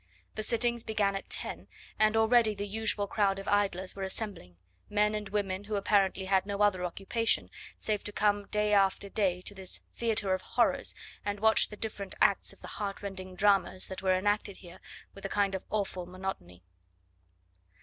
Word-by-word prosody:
The 215 Hz, -, -3 dB
sittings 235 Hz, +1 st, +1 dB
began 205 Hz, -3 st, +1 dB
at 195 Hz, -, -5 dB
ten, -, -, -4 dB, 0.3 s
and 215 Hz, +1 st, +4 dB
already 225 Hz, -1 st, +4 dB
the 200 Hz, 0 st, -3 dB
usual 210 Hz, 0 st, +1 dB
crowd 200 Hz, -1 st, +1 dB
of 195 Hz, -, -7 dB
idlers 195 Hz, -2 st, +1 dB
were 195 Hz, -, -7 dB
assembling 190 Hz, -, -4 dB, 0.3 s
men 210 Hz, 0 st, +2 dB
and 210 Hz, -2 st, -3 dB
women 200 Hz, -1 st, -2 dB
who 210 Hz, 0 st, -3 dB
apparently 195 Hz, -1 st, +2 dB
had 190 Hz, 0 st, +2 dB
no 200 Hz, 0 st, 0 dB
other 190 Hz, -3 st, +3 dB
occupation 195 Hz, +6 st, +1 dB, 0.3 s
save 210 Hz, -2 st, -1 dB
to 205 Hz, -, -3 dB
come 205 Hz, -1 st, +1 dB
day 210 Hz, 0 st, +1 dB
after 195 Hz, 0 st, +3 dB
day 190 Hz, -4 st, 0 dB
to 205 Hz, -, -4 dB
this 190 Hz, -2 st, -4 dB, 0.2 s
theatre 215 Hz, -4 st, +1 dB
of 185 Hz, -, -1 dB
horrors -, -, +1 dB, 0.3 s
and 205 Hz, 0 st, -2 dB
watch 220 Hz, +1 st, +4 dB
the 210 Hz, -, -9 dB
different 205 Hz, -3 st, -5 dB
acts 200 Hz, -, +3 dB
of 195 Hz, -, -12 dB
the -, -, -8 dB
heartrending 195 Hz, -2 st, -5 dB
dramas 195 Hz, -1 st, +2 dB
that 190 Hz, -, -6 dB
were 185 Hz, -1 st, +3 dB
enacted 205 Hz, 0 st, 0 dB
here 180 Hz, 0 st, -13 dB, 0.3 s
with 195 Hz, -, -13 dB
a 195 Hz, -, -3 dB
kind 200 Hz, -1 st, +1 dB
of 190 Hz, -, -2 dB
awful 195 Hz, -4 st, -2 dB
monotony. 175 Hz, -, -6 dB
200 Hz, 180 wpm, -30 LUFS, 190-210 Hz, 0.3 s, and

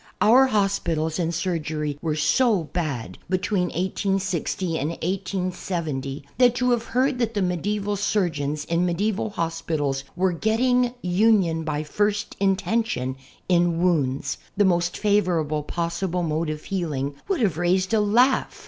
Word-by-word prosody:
Our 255 Hz, +5 st, +6 dB
hosjiitals 185 Hz, -7 st, 0 dB
and 170 Hz, -1 st, 0 dB
surgery 155 Hz, -4 st, -2 dB
were 155 Hz, -2 st, -1 dB
so 180 Hz, -, +2 dB
bad 140 Hz, -, -4 dB
between 185 Hz, 0 st, +1 dB
1860 185 Hz, -1 st, -1 dB
and 145 Hz, +3 st, -1 dB
1870 170 Hz, -6 st, -3 dB
that 245 Hz, -1 st, +5 dB
to 250 Hz, 0 st, +1 dB
have 235 Hz, -1 st, +1 dB
heard 255 Hz, +2 st, +1 dB
that 230 Hz, -2 st, -1 dB
the 205 Hz, -, +1 dB
nedieval 205 Hz, +3 st, -1 dB
surgeons 160 Hz, -8 st, -1 dB
in 170 Hz, +1 st, +1 dB
medieval 200 Hz, +5 st, 0 dB
hospitals 160 Hz, -7 st, -2 dB
were 185 Hz, +1 st, +2 dB
"getting 245 Hz, +6 st, +1 dB
union 180 Hz, -3 st, +3 dB
by 150 Hz, -1 st, -2 dB
first 205 Hz, +6 st, -1 dB
intention" 195 Hz, -, 0 dB, 0.3 s
in 175 Hz, -2 st, +2 dB
wounds 150 Hz, -7 st, 0 dB
— -, -, -33 dB
the 205 Hz, -, +4 dB
most 175 Hz, -1 st, +1 dB
favorable 175 Hz, -8 st, +1 dB
possible 170 Hz, +3 st, -2 dB
mode 160 Hz, 0 st, -1 dB
of 155 Hz, 0 st, -5 dB
healing 150 Hz, -7 st, -2 dB
— -, -, -36 dB
would 390 Hz, -5 st, 0 dB
have 185 Hz, -8 st, +1 dB
raised 185 Hz, +4 st, +1 dB
a 220 Hz, -, +4 dB
laugh. 240 Hz, +6 st, +2 dB
180 Hz, 140 wpm, -24 LUFS, 160-205 Hz, 0.3 s, Our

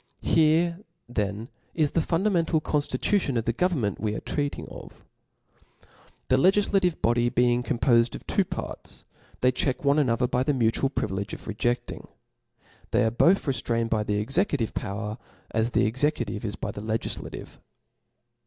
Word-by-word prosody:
Here 165 Hz, +2 st, +3 dB, 0.3 s
then 105 Hz, -1 st, -2 dB, 0.3 s
is 155 Hz, -3 st, +2 dB
the 165 Hz, -, +2 dB
fundamental 170 Hz, -1 st, +1 dB
conftitution 145 Hz, -, 0 dB
of 115 Hz, -, -1 dB
the 120 Hz, -, +1 dB
government 130 Hz, -, 0 dB
we 105 Hz, -1 st, -1 dB
are -, -, -3 dB
treating 145 Hz, -1 st, -3 dB
of. -, -, -12 dB, 1.2 s
The 130 Hz, -, +4 dB
legiflative 190 Hz, +1 st, +3 dB
bo 115 Hz, -, +4 dB
dy 120 Hz, 0 st, +2 dB
being 120 Hz, 0 st, +2 dB
compofed 120 Hz, 0 st, +2 dB
of -, -, -9 dB
two -, -, +2 dB
parts, -, -, -5 dB, 0.4 s
they 125 Hz, -, +4 dB
check 130 Hz, +2 st, -1 dB
one 140 Hz, +2 st, +4 dB
another 125 Hz, -3 st, +2 dB
by 125 Hz, 0 st, 0 dB
the 140 Hz, +2 st, +1 dB
mutual 120 Hz, +2 st, +2 dB
privilege 100 Hz, -6 st, -3 dB
of -, -, -13 dB
rejefting. 120 Hz, +3 st, -2 dB, 0.8 s
They 120 Hz, +2 st, +2 dB
are 110 Hz, -, +1 dB
both 170 Hz, -, +3 dB
rcftrained 115 Hz, -4 st, -1 dB
by 110 Hz, -1 st, +2 dB
the 105 Hz, -1 st, -1 dB
executive 135 Hz, -, 0 dB
power, 105 Hz, +2 st, -4 dB, 0.3 s
as 110 Hz, +1 st, +1 dB
the 120 Hz, -, +2 dB
executive 120 Hz, -3 st, 0 dB
is 105 Hz, -2 st, -3 dB
by -, -, -4 dB
the 100 Hz, -, -7 dB
legiflative. 110 Hz, +1 st, -4 dB
125 Hz, 155 wpm, -26 LUFS, 110-150 Hz, 1.2 s, The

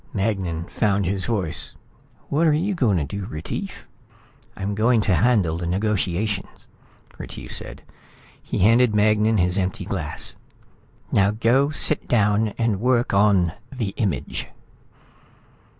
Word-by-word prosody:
Magnan 95 Hz, -5 st, -1 dB
found 100 Hz, +2 st, 0 dB
his 95 Hz, +1 st, -1 dB
voice. 95 Hz, -9 st, -2 dB, 0.5 s
"What 160 Hz, +4 st, +2 dB
are 155 Hz, -, +4 dB
you 180 Hz, +7 st, 0 dB
going 120 Hz, -, +2 dB
to 80 Hz, -, 0 dB
do, 95 Hz, +7 st, -5 dB
Retief?" 75 Hz, +2 st, -6 dB, 0.7 s
"I'm 100 Hz, +1 st, -3 dB
going 115 Hz, +3 st, +3 dB
to 100 Hz, -, +1 dB
handle 90 Hz, -4 st, +2 dB
the 85 Hz, -, -3 dB
negotiation," 100 Hz, +1 st, -1 dB, 0.7 s
Retief -, -, -7 dB
said. -, -, -3 dB, 0.6 s
He -, -, -4 dB
handed 115 Hz, +3 st, +4 dB
Magnan 105 Hz, +1 st, +3 dB
his 90 Hz, +1 st, +2 dB
empty 95 Hz, +1 st, -2 dB
glass. 80 Hz, -6 st, -4 dB, 0.8 s
"Now 100 Hz, 0 st, +4 dB
go 115 Hz, +6 st, +2 dB
sit 150 Hz, 0 st, +2 dB
down 105 Hz, -1 st, +2 dB
and 115 Hz, -4 st, 0 dB
work 125 Hz, 0 st, +1 dB
on 100 Hz, -4 st, +3 dB, 0.2 s
the 120 Hz, -6 st, -3 dB
Image." 100 Hz, -1 st, -3 dB
105 Hz, 130 wpm, -23 LUFS, 95-115 Hz, 0.8 s, are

